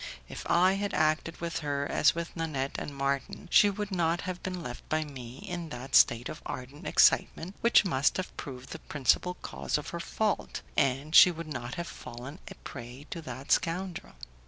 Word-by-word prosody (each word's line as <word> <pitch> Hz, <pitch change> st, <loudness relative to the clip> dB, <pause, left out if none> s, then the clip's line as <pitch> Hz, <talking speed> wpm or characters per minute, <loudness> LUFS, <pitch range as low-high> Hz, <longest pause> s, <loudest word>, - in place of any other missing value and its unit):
If -, -, -8 dB
I 185 Hz, +2 st, +5 dB
had 205 Hz, -, -2 dB
acted 155 Hz, +1 st, +1 dB
with 170 Hz, -1 st, -3 dB
her 145 Hz, -2 st, -1 dB
as 150 Hz, -, +3 dB
with 170 Hz, 0 st, -5 dB
Nanette 150 Hz, -5 st, -2 dB
and 145 Hz, -, -6 dB
Marton, 140 Hz, -1 st, -2 dB
she 205 Hz, -, +7 dB
would 205 Hz, 0 st, -4 dB
not 170 Hz, -2 st, +1 dB
have 185 Hz, -1 st, -5 dB
been 180 Hz, -2 st, -4 dB
left 125 Hz, -3 st, -8 dB
by 155 Hz, 0 st, +1 dB
me 130 Hz, -4 st, -9 dB
in 175 Hz, -3 st, -4 dB
that 125 Hz, 0 st, -8 dB
state 120 Hz, +1 st, +5 dB
of -, -, -7 dB
ardent 130 Hz, +4 st, -7 dB
excitement 180 Hz, +4 st, +3 dB
which 235 Hz, -3 st, +5 dB
must 140 Hz, -6 st, +2 dB
have 185 Hz, -, -4 dB
proved 130 Hz, -1 st, -8 dB
the 160 Hz, -, -6 dB
principal 150 Hz, +6 st, +1 dB
cause -, -, -2 dB
of 150 Hz, -, -6 dB
her 170 Hz, -, -5 dB
fault, 210 Hz, +4 st, -2 dB
and 140 Hz, +3 st, +1 dB
she 180 Hz, -, +10 dB
would 165 Hz, -1 st, -5 dB
not 120 Hz, -1 st, -5 dB
have 170 Hz, -1 st, -3 dB
fallen 130 Hz, +3 st, -9 dB
a -, -, -8 dB
prey 125 Hz, +2 st, -9 dB
to 170 Hz, -, -4 dB
that 130 Hz, -1 st, -7 dB
scoundrel. 175 Hz, +1 st, 0 dB
155 Hz, 190 wpm, -29 LUFS, 135-175 Hz, -, she